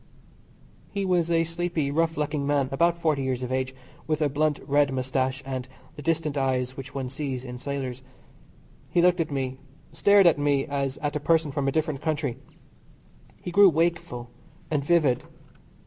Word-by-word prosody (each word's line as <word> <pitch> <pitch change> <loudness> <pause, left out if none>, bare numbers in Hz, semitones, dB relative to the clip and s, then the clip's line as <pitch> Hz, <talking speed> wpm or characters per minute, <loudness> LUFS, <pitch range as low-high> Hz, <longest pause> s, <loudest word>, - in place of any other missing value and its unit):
He 200 -1 -2
was 175 -3 +2
a 165 -1 +3
sleepy, 165 -3 -2
rough 165 +1 +1
looking 150 -1 -1
man 140 -2 +1
about 170 +5 +2
40 155 -4 +1
years 130 -1 -2
of 125 - -4
age, 130 0 -1 0.3
with 155 -1 0
a 150 -2 +2
blunt 150 +1 +1
red 145 0 +3
moustache, 130 +1 -1
and 130 -1 -4 0.3
the 150 - -8
distant 155 -1 0
eyes 130 -1 0
which 135 0 -9
one 135 -2 -2
sees 135 -1 -4
in 125 -1 -7
sailors. 130 -2 -4 0.9
He - - +1
looked 180 0 +4
at 165 - 0
me, 130 -2 -3 0.3
stared 200 +5 +5
at 165 -4 +5
me 145 -1 +2
as 140 -1 -2
at 145 0 -1
a - - 0
person 160 0 +2
from 140 -1 -1
a - - +2
different 155 -2 -1
country. 150 -6 -1 1.1
He 180 - -4
grew 200 +2 +7
wakeful 160 -7 -1 0.4
and 145 -2 +1
vivid. 145 -5 +3
145 Hz, 175 wpm, -26 LUFS, 130-165 Hz, 1.1 s, grew